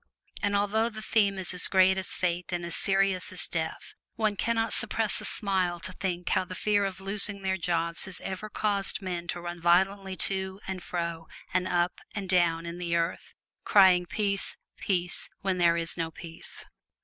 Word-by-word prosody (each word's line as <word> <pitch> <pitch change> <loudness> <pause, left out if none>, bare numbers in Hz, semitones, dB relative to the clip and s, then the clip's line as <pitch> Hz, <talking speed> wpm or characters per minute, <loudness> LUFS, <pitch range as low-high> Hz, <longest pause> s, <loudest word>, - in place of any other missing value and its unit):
And 205 -1 +1
although 210 +3 +2
the 215 -1 -9
theme 200 -3 +2
is 185 -1 +1
as 180 - +3
great 190 0 +5
as 190 -1 -3
Fate 180 0 -1
and 175 -1 -2
as 170 - -3
serious 195 -1 +1
as 185 - -1
Death, 160 -1 -4 0.2
one 215 -2 +1
can 230 +3 0
not 225 0 0
suppress 225 -2 0
a - - -6
smile 185 -4 0
to 185 +2 -6
think 180 -2 -3
how 185 - +2
the 185 0 -8
fear 205 0 +2
of 190 -1 -4
losing 200 +1 -1
their 190 0 +1
jobs 170 -2 0
has 185 -2 -5
ever 195 +3 -5
caused 200 -1 0
men 175 -2 -3
to 175 - -3
run 175 0 -6
violently 190 +3 +3
to 190 0 0
and 190 -1 -4
fro 170 -2 -4 0.3
and 185 0 +1
up 175 0 +1 0.2
and 195 -3 -4
down 170 -2 +3
in 170 +1 -6
the 170 -1 -1
earth, 170 +1 -2 0.3
crying 185 -3 +6
peace, 200 -1 0 0.2
peace, 180 -2 -1
when 190 -2 0
there 170 -1 +4
is 165 0 -1
no 165 -1 -2
peace. 165 0 -9
185 Hz, 190 wpm, -28 LUFS, 175-200 Hz, 0.3 s, crying